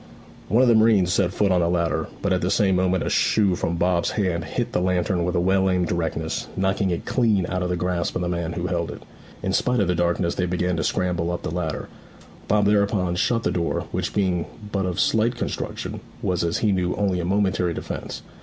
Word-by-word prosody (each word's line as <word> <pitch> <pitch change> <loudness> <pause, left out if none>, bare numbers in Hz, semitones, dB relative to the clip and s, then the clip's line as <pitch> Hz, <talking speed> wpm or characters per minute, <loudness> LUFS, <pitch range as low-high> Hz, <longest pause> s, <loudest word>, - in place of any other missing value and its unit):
One 115 +6 +4
of - - +4
the 120 - +6
marines 110 -5 +4
set 95 -3 +2
foot 100 +1 +1
on 90 - +3
the 85 - +1
ladder, 85 -2 0 0.2
but 100 -2 +2
at 90 - 0
the 90 - 0
same 95 -1 +3
moment 95 -1 +1
a - - -1
shoe 100 -4 +3
from 85 - -2
Bob's 85 0 +1
hand 90 -5 -1
hit 80 - -3
the - - 0
lantern 90 0 +1
with 90 +1 -1
well 95 +2 +2
aimed 90 -1 +1
directness, 80 -2 -2
knocking 95 +1 +1
it 85 - -3
clean 110 -7 +2
out 90 -1 -2
of 90 - -1
the 90 - 0
grasp 90 -1 -1
of 90 - -1
the - - -1
man 85 -1 -2
who - - -3
held - - -1
it. - - -8 0.4
In 95 - -1
spite 125 +4 +1
of 100 - +2
the 90 - +2
darkness 85 0 0
they 90 - -1
began 90 0 0
to 80 - -1
scramble 90 -1 0
up 85 - -3
the - - -3
ladder. 85 -3 -3 0.6
Bob 105 0 +3
thereupon 100 -3 +2
shut 115 +3 +1
the - - +1
door, 85 -1 -1
which - - -2
being 90 -4 0 0.2
but 95 -2 0
of 90 0 -3
slight 115 +2 +2
construction, 120 - -4 0.2
was 90 -2 0
as 85 0 0
he 110 - +1
knew 90 -2 0
only 95 -3 0
a - - -2
momentary 95 -3 +1
defence. - - -6
90 Hz, 230 wpm, -23 LUFS, 85-100 Hz, 0.6 s, the